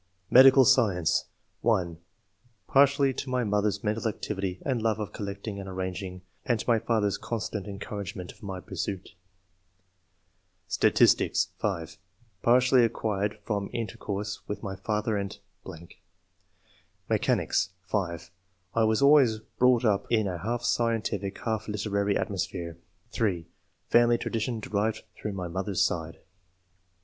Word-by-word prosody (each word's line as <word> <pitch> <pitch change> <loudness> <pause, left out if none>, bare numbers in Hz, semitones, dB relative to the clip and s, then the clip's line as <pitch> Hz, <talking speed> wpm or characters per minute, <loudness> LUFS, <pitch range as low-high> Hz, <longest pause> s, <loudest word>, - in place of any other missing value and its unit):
Medical 130 +1 +8
Science. 100 -12 +3 0.2
— - - -45
(1) 90 -8 +1 0.7
[Partly] 140 +1 +4
to 130 - -5
my 125 -1 +1
mother's 105 -1 0
mental 110 +2 -1
activity 95 -4 -3
and 130 -4 0
love 110 -1 +1
of 105 -4 -5
collecting 100 0 -5
and 95 -1 -7
arranging, 95 0 -5 0.2
and 120 -3 0
to - - -6
my 115 -2 +4
father's 105 -3 0
constant 105 -3 -4
en 100 -1 -6
couragement 100 -3 -6
of - - -22
my 95 -3 -5
pursuit. 95 +1 -5 1.6
Stati9tio8.~{5) 85 +5 +2 0.4
[Partly] 125 +1 +5
acquired 105 -2 -1
from 100 -2 -2
inter 115 -5 -4
course 105 +1 -4
with 105 - -4
mr 95 -3 -6
father 105 0 -1
and.... 100 -1 -4 0.3
brought - - -8
up 80 - -13
III.] 85 - -15 1.2
ORIGIN - - +2
OF - - -5
TASTE - - +1 0.2
FOR 95 0 0
SCIENCE. 85 0 -9 0.4
211 115 -2 +3
in 110 -3 +2
a 90 -2 -3
half 115 +6 -2
scientific, 110 -4 0
half 110 -2 -2
literary 100 -1 0
atmosphere. 90 -3 -3 0.3
(3) 95 -8 -1 0.5
Family 120 0 +5
tradition 115 +1 -2
derived 105 +1 -1
through 105 - -5
my 90 -2 -4
mother's 95 +2 0
side. 85 -4 -3
105 Hz, 135 wpm, -28 LUFS, 95-115 Hz, 1.6 s, Medical